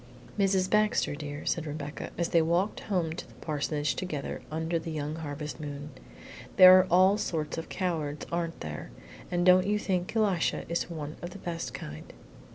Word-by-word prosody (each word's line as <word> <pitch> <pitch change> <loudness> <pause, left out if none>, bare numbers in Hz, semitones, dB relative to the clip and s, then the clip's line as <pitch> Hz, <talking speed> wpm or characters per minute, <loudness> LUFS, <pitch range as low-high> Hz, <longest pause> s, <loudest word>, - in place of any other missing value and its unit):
"Mrs. 195 -2 +2
Baxter, 215 -3 +2
dear," 145 0 -6
said 160 -2 -1
Rebecca, 150 0 -5
as 170 - 0
they 165 - +4
walked 175 +6 +1
home 180 -6 -1
to 170 - -7
the - - -18
parsonage 150 -1 -1
together 155 -7 -4
under 160 +2 -1
the 165 - -6
young 155 0 -3
harvest 150 -3 -5
moon; 145 0 -6 0.6
"there 185 -1 +10
are 185 - +2
all 185 +4 +5
sorts 155 -6 -2
of 165 - -8
cowards, 160 -6 -2
aren't 170 -1 -2
there, 75 -5 -6 0.4
and 175 0 0
don't 185 +1 +6
you 210 +1 +2
think 185 -1 -2
Elisha 200 -6 +1
is 170 +1 -1
one 155 -2 -6
of 175 - -5
the 180 - -10
best 165 -9 -5
kind." 75 - -8
165 Hz, 175 wpm, -29 LUFS, 150-185 Hz, 0.6 s, there